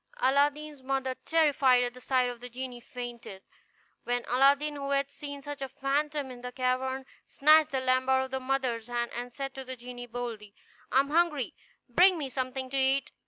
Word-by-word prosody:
Aladdin's 290 +2 +1
mother, 265 0 -1
terrified 280 -6 +4
at 245 0 -2
the 250 - -13
sight 255 -1 +2
of 245 -1 -5
the 245 +1 -8
genie, 250 0 -6
fainted; 240 -6 -8 0.6
when 245 0 -1
Aladdin, 280 +4 +3
who 280 -1 -4
had 280 0 +1
seen 285 -2 -7
such 290 -1 -6
a 270 - -3
phantom 285 0 -1
in 245 -1 -10
the 250 0 -6
cavern, 260 +1 -1 0.2
snatched 310 +2 +5
the 270 -3 -1
lamp 255 0 +2
out 265 0 +4
of 265 - -7
his 265 0 -2
mother's 255 -4 -1
hand, 240 -1 -2
and 245 +1 -5
said 270 +2 -5
to 265 - -7
the 260 0 -7
genie 245 0 -9
boldly, 225 -4 -6 0.4
"I 265 - +6
am 280 +1 -6
hungry; 315 -6 +2 0.3
bring 360 +9 +5
me 285 -4 -3
something 260 0 -3
to 275 - -1
eat." 270 +1 +2
265 Hz, 195 wpm, -29 LUFS, 245-280 Hz, 0.6 s, I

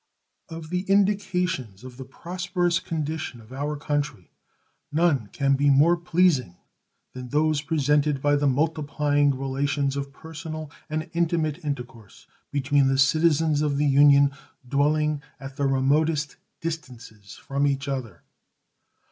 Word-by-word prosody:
Of 165 -1 -8
the 180 0 0
indications 180 - 0
of 130 -1 -11
the 130 - -8
prosperous 175 +4 -2
condition 155 -5 -4
of 115 +3 -14
our 145 +2 -3
country, 145 -9 -3 0.6
none 150 -7 +2
can 140 +5 0
be 140 +1 +2
more 150 +5 +5
pleasing 170 - +1 0.6
than 125 -1 -8
those 150 +1 +1
presented 150 -2 +1
by 145 +1 +2
the 145 0 +1
multiplying 145 -1 +1
relations 135 +1 -1
of 140 0 -4
personal 155 0 -8 0.2
and 155 +2 -3
intimate 165 -1 0
intercourse 120 -7 -7 0.2
between 140 0 +2
the 135 0 +1
citizens 155 +1 +3
of 145 -2 0
the 150 - +1
Union 140 0 +5 0.4
dwelling 150 +2 +1 0.2
at 135 0 -9
the 140 0 0
remotest 145 +3 +1 0.3
distances 125 -10 -7
from 140 +1 -1
each 140 0 -1
other. 120 - -5
145 Hz, 130 wpm, -25 LUFS, 135-155 Hz, 0.6 s, more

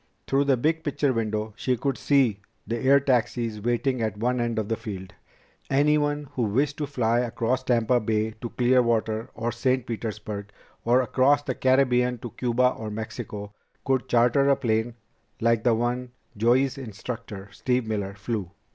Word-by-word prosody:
Through 140 +1 +2
the 135 -2 +3
big 160 +6 0
picture 145 -2 0
window 110 -1 -2
She 125 +2 0
could 135 +3 -1
see 130 -8 +2 0.3
the 115 0 -2
air 140 +3 +5
taxis 120 -4 0
waiting 120 +2 0
at 110 -2 -2
one 125 +3 0
end 120 -1 -1
of 110 -2 -1
the 115 - 0
field. 95 -4 -7 0.6
Anyone 145 +1 +2
who 125 - -2
wished 135 +7 +1
to 150 - -2
fly 120 -4 +1
across 120 +1 0
Tampa 120 -1 +2
Bay 110 0 0
to 120 - -4
Clearwater 115 -3 +1
or 115 +1 -2
St. 125 +1 0
Petersburg, 105 -3 -5 0.3
or 125 +2 +4
across 135 +4 +3
the 130 - -2
Caribbean 125 -1 +2
to 120 0 -8
Cuba 125 +2 +2
or 110 -3 -6
Mexico, 105 -1 -6 0.3
could 130 -1 0
charter 125 +4 +4
a 140 - +5
plane 115 -2 -1 0.4
like 115 -1 +2
the 120 -2 +4
one 120 +2 -2 0.2
Joey's 125 +5 +2
instructor 110 -3 -7
Steve 125 +3 -1
Miller 100 -3 -3
flew. 100 -2 -3
120 Hz, 165 wpm, -25 LUFS, 110-130 Hz, 0.6 s, air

